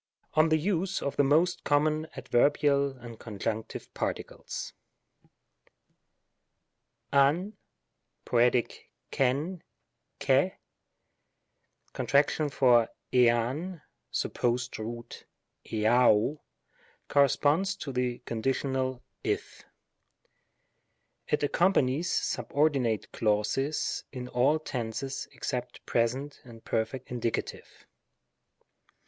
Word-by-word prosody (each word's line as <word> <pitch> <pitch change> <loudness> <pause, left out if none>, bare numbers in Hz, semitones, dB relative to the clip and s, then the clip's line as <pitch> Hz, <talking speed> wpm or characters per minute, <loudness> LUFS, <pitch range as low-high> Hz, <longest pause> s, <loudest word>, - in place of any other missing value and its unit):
Ok 155 +1 +5
the 160 - +4
use 185 +3 0
of 140 - -3
the 145 - +4
most 160 +6 +2
common 155 +2 +2
Adveebial 140 +1 +2
AND 115 -1 -9
Conjunctive 110 0 -5
Paetioles. - - -4 2.4
av 150 +9 +3 0.7
(poet. 120 0 +4 0.6
X8V, 145 +7 0 0.6
xs)y - - +3 1.4
cont. 145 +1 +2
for 120 -4 +4 0.2
iav 125 +8 +2 0.3
(supposed 120 0 -1
root, 115 +2 -7 0.4
ha(S)y 110 +4 +3 0.7
corresponds 145 +7 +3
to 155 -7 -6
the 125 -1 -1
conditional 130 +2 -1 0.2
(^/'). - - -3 1.6
It 150 - +1
accompa 170 +2 +3
nies 140 +7 -1
subordinate 135 -7 0
clauses 110 +7 0
in 125 -2 -6
all 135 +5 +3
tenses 135 -2 -4
except 125 -2 -5
Pres. 115 +1 +2
and 130 -4 -10
Perf. 110 +4 -1
Indie. 120 -2 -3
135 Hz, 80 wpm, -29 LUFS, 120-150 Hz, 2.4 s, Ok